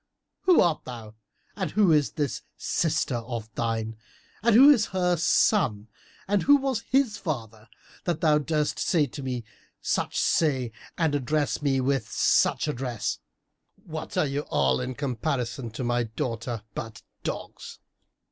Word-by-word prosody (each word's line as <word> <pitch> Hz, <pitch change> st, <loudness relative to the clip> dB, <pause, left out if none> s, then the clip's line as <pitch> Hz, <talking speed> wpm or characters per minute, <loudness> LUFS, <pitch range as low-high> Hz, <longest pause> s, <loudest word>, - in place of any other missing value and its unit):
Who 365 Hz, -2 st, +6 dB
art 170 Hz, -3 st, +1 dB
thou 115 Hz, -4 st, -9 dB, 0.4 s
and 190 Hz, -5 st, -2 dB
who 200 Hz, 0 st, +3 dB
is 150 Hz, -2 st, +3 dB
this 145 Hz, -5 st, -2 dB, 0.2 s
sister 150 Hz, -6 st, 0 dB
of 115 Hz, -2 st, -6 dB
thine 115 Hz, -1 st, -2 dB, 0.4 s
and 230 Hz, +1 st, +4 dB
who 275 Hz, +5 st, +9 dB
is 230 Hz, -7 st, +3 dB
her 180 Hz, -2 st, +1 dB
son 150 Hz, -, +2 dB, 0.4 s
and 200 Hz, -1 st, +2 dB
who 285 Hz, -, +6 dB
was 270 Hz, -4 st, -1 dB
his 260 Hz, -5 st, +2 dB
father,[FN#329] 115 Hz, -, -7 dB
that 170 Hz, -3 st, -1 dB
thou 150 Hz, -2 st, +4 dB
durst 150 Hz, 0 st, -1 dB
say 160 Hz, -4 st, +2 dB
to 140 Hz, +2 st, -8 dB
me 125 Hz, -3 st, -3 dB, 0.4 s
such -, -, -1 dB
say 130 Hz, -7 st, +1 dB, 0.3 s
and 160 Hz, -3 st, +1 dB
address 145 Hz, +2 st, 0 dB
me 135 Hz, -2 st, +1 dB
with 135 Hz, -3 st, 0 dB
such -, -, +2 dB
address? 125 Hz, -6 st, -2 dB, 0.6 s
What 160 Hz, -1 st, -7 dB
are -, -, +3 dB
ye 140 Hz, 0 st, -2 dB
all, 70 Hz, -, +1 dB
in 130 Hz, 0 st, -4 dB
comparison 130 Hz, -1 st, -2 dB
with 115 Hz, -1 st, -8 dB
my 120 Hz, -1 st, 0 dB
daughter, 115 Hz, 0 st, -4 dB
but 115 Hz, -1 st, -7 dB, 0.2 s
dogs?" -, -, -6 dB
140 Hz, 145 wpm, -26 LUFS, 115-165 Hz, 0.6 s, who